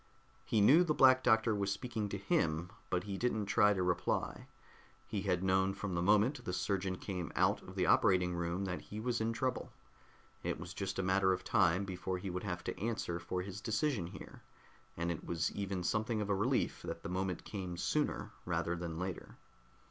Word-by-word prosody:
He 110 Hz, -, +2 dB
knew 145 Hz, -, +7 dB
the 155 Hz, -4 st, 0 dB
Black 130 Hz, -1 st, +7 dB
Doctor 110 Hz, -1 st, +4 dB
was 100 Hz, -1 st, 0 dB
speaking 110 Hz, -1 st, -3 dB
to 100 Hz, -, -3 dB
him, 85 Hz, -3 st, 0 dB, 0.2 s
but 90 Hz, 0 st, 0 dB
he 100 Hz, -2 st, -5 dB
didn't 110 Hz, -4 st, 0 dB
try 105 Hz, +1 st, +4 dB
to 95 Hz, -3 st, +1 dB
reply. 90 Hz, -1 st, -1 dB, 0.6 s
He 100 Hz, -, -3 dB
had 95 Hz, -2 st, 0 dB
known 95 Hz, +1 st, +2 dB
from 100 Hz, -2 st, -4 dB
the 85 Hz, -, 0 dB
moment 105 Hz, +8 st, +3 dB
the 90 Hz, -, -3 dB
surgeon 95 Hz, 0 st, -1 dB
came 90 Hz, -3 st, -4 dB
out -, -, +3 dB
of -, -, -11 dB
the -, -, +1 dB
operating 90 Hz, -1 st, +4 dB
room 85 Hz, +2 st, -2 dB
that 90 Hz, -2 st, -3 dB
he 105 Hz, -, -8 dB
was 120 Hz, 0 st, -1 dB
in 110 Hz, +1 st, +1 dB
trouble. 125 Hz, +2 st, -2 dB, 0.7 s
It -, -, -2 dB
was 90 Hz, +2 st, -7 dB
just 95 Hz, 0 st, -3 dB
a 95 Hz, -, 0 dB
matter 95 Hz, 0 st, +3 dB
of 90 Hz, -, -4 dB
time 95 Hz, +1 st, +3 dB
before 95 Hz, 0 st, -3 dB
he 90 Hz, +1 st, -5 dB
would 90 Hz, +1 st, -4 dB
have 90 Hz, -3 st, -3 dB
to -, -, -4 dB
answer 105 Hz, -6 st, -2 dB
for 90 Hz, +1 st, -3 dB
his 100 Hz, +1 st, -7 dB
decision 110 Hz, -, 0 dB
here, -, -, -10 dB, 0.6 s
and 85 Hz, +1 st, -1 dB
it 80 Hz, -, -5 dB
was 85 Hz, -2 st, -1 dB
even 100 Hz, -2 st, -3 dB
something 110 Hz, +4 st, 0 dB
of 105 Hz, -1 st, -1 dB
a -, -, +3 dB
relief 120 Hz, +7 st, 0 dB
that -, -, -6 dB
the -, -, -4 dB
moment 90 Hz, 0 st, -2 dB
came 95 Hz, -4 st, -5 dB
sooner -, -, -1 dB
rather 85 Hz, -, -1 dB
than 85 Hz, -2 st, -5 dB
later. 90 Hz, +1 st, -5 dB
95 Hz, 200 wpm, -34 LUFS, 90-105 Hz, 0.7 s, knew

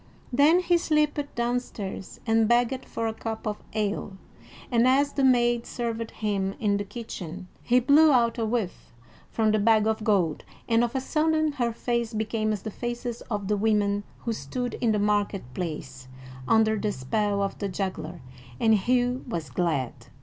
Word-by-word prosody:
Then 300 Hz, +7 st, +5 dB
he 350 Hz, -1 st, +3 dB
slipped 300 Hz, -3 st, 0 dB
downstairs 235 Hz, -5 st, -3 dB
and 225 Hz, -1 st, +3 dB
begged 245 Hz, +2 st, +2 dB
for 230 Hz, -, -4 dB
a 225 Hz, -, -1 dB
cup 220 Hz, 0 st, -5 dB
of 210 Hz, -1 st, -3 dB
ale, 205 Hz, -2 st, -2 dB, 0.5 s
and 235 Hz, 0 st, +4 dB
as 280 Hz, +2 st, +3 dB
the 275 Hz, -, 0 dB
maid 240 Hz, -2 st, +3 dB
served 230 Hz, -1 st, -3 dB
him 195 Hz, -2 st, -2 dB
in 205 Hz, -2 st, +2 dB
the 205 Hz, -, -2 dB
kitchen, 190 Hz, -4 st, -7 dB
he 250 Hz, +1 st, +3 dB
blew 295 Hz, +5 st, +6 dB
out 235 Hz, -2 st, +3 dB
a -, -, 0 dB
whiff 220 Hz, -5 st, -3 dB, 0.4 s
from 220 Hz, -1 st, +1 dB
the 215 Hz, -, +2 dB
bag 215 Hz, 0 st, +4 dB
of 220 Hz, 0 st, 0 dB
gold, 190 Hz, -8 st, +1 dB, 0.2 s
and 230 Hz, 0 st, +3 dB
of 240 Hz, +2 st, -2 dB
a -, -, +2 dB
sudden 310 Hz, +2 st, +1 dB
her 245 Hz, -5 st, -1 dB
face 235 Hz, -1 st, -2 dB
became 215 Hz, 0 st, -1 dB
as 210 Hz, -3 st, -3 dB
the 220 Hz, -, -4 dB
faces 240 Hz, +1 st, -4 dB
of 205 Hz, -3 st, -2 dB
the 210 Hz, -, +2 dB
women 205 Hz, -1 st, +1 dB, 0.2 s
who 230 Hz, -, -2 dB
stood 235 Hz, -, -4 dB
in 235 Hz, -3 st, +3 dB
the 210 Hz, -, +2 dB
market 205 Hz, -1 st, +1 dB
place 145 Hz, -6 st, -5 dB, 0.4 s
under 220 Hz, -1 st, +3 dB
the 210 Hz, 0 st, 0 dB
spell 200 Hz, +9 st, -1 dB
of 195 Hz, -, -3 dB
the 200 Hz, -, -2 dB
juggler, 180 Hz, -4 st, -4 dB, 0.4 s
and 220 Hz, -1 st, +4 dB
Hugh 245 Hz, +4 st, +1 dB
was 160 Hz, -, -4 dB
glad. 140 Hz, -4 st, 0 dB
220 Hz, 175 wpm, -26 LUFS, 200-245 Hz, 0.5 s, blew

